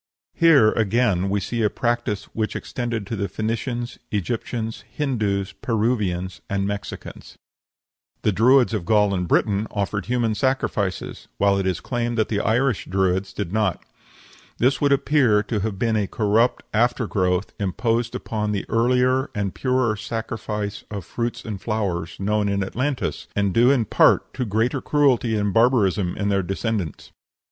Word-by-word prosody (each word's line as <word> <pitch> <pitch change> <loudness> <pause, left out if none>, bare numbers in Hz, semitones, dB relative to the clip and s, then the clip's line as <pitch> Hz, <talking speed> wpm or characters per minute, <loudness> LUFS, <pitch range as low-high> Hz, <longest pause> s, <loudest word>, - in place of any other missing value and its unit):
Here 150 -11 +5
again 105 -4 +1
we 100 +1 +1
see 115 +4 -3
a 105 - +3
practice 120 -3 -1
which 110 -1 -2
extended 120 -4 -3
to 115 - -4
the 100 -1 -2
Phoenicians, 115 +4 -3
Egyptians, 110 +3 -3
Hindoos, 105 -9 -1
Peruvians, 105 -6 -1
and 100 0 0
Mexicans. 100 0 -6 0.9
The 105 - +3
Druids 120 +5 +4
of 105 -5 -1
Gaul 105 +1 +3
and 90 -2 -1
Britain 105 +4 +1
offered 100 -1 -2
human 120 -2 +1
sacrifices, 105 -6 -1
while 100 0 +3
it 95 - -1
is 95 - 0
claimed 120 -1 -2
that 110 - +1
the 105 - 0
Irish 120 +2 +1
Druids 95 0 0
did 100 -2 -4
not. 105 -5 0 0.7
This 125 +1 +2
would 145 -1 +3
appear 140 -6 +3
to 110 0 -2
have 100 -1 -3
been 115 +2 +1
a 105 -2 +1
corrupt 110 +4 +1
after 120 +2 +2
growth 90 -1 0
imposed 115 +4 -1
upon 105 -1 -2
the 100 - -2
earlier 125 +3 +2
and 100 -2 -2
purer 130 -4 +1
sacrifice 105 -1 -4
of 100 -4 -6
fruits 115 +2 -4
and 105 -4 -5
flowers 95 -7 -2
known 105 +1 +1
in 100 0 0
Atlantis, 130 +7 -2
and 100 -2 +1
due 120 +4 +5
in 130 -5 +3
part - - +3
to 125 - -2
greater 115 +5 0
cruelty 130 -6 +2
and 105 -2 0
barbarism 105 -6 +2
in 100 0 0
their 100 -1 +2
descendants. 95 - -3
110 Hz, 155 wpm, -23 LUFS, 100-120 Hz, 0.9 s, Here